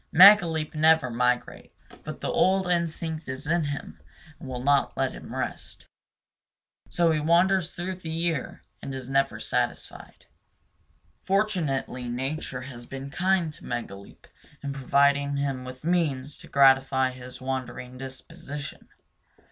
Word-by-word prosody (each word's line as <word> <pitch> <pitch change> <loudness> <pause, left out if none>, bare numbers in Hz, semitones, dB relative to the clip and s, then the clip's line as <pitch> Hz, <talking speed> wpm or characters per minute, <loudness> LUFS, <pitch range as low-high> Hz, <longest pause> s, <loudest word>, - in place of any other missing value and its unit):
Megaleep 170 -4 +7
never 155 -4 +4
migrates; 125 +1 -1 0.3
but - - -7
the - - -2
old 190 0 +3
instinct 165 -2 -2
is 130 0 -5
in 165 +1 +1
him 145 0 -6 0.4
and 135 - -9
will 125 -1 -5
not 140 0 +2
let 135 -1 +1
him - - -9
rest. - - -5 1.0
So 170 -1 +3
he 155 - +1
wanders 175 +3 +3
through 185 +1 -4
the 170 -3 -8
year, 165 -3 -2 0.2
and 135 - -5
is 130 0 -7
never 135 0 +1
satisfied. - - -3 0.9
Fortunately 160 - -1
nature 130 +1 -3
has 125 -2 -10
been 135 +1 -7
kind 180 -2 +1
to - - -13
Megaleep 100 -5 -7 0.4
in 140 -1 -3
providing 140 +1 +2
him 135 -2 -2
with 130 +3 -9
means 150 -6 0
to - - -13
gratify 135 -1 +4
his 125 0 -10
wandering 130 -1 -5
disposition. 135 +2 -8
140 Hz, 130 wpm, -26 LUFS, 130-165 Hz, 1.0 s, Megaleep